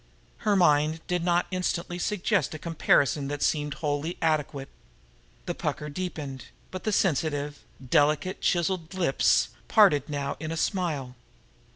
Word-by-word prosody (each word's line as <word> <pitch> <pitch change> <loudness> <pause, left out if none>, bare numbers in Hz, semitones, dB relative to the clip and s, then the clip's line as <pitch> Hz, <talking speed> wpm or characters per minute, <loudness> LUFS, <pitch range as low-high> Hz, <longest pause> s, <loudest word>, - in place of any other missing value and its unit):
Her 210 -3 +1
mind 155 -3 +3
did 180 -1 -1
not 175 0 +2
instantly 180 -1 -2
suggest 195 -4 0
a - - -4
comparison 150 -3 +2
that 145 +1 -3
seemed 150 -2 0
wholly 150 +2 -2
adequate. 150 -4 -1 0.8
The - - -2
pucker 150 - -3
deepened, 145 -5 -5 0.3
but 185 - -7
the 215 - +1
sensitive, 150 -6 0 0.3
delicately 150 +8 +2
chiseled 175 0 0
lips 170 -7 +2 0.2
parted 185 - +4
now 140 -1 -3
in 155 +1 -4
a 165 - -3
smile. 155 -10 -1
160 Hz, 135 wpm, -27 LUFS, 145-180 Hz, 0.8 s, parted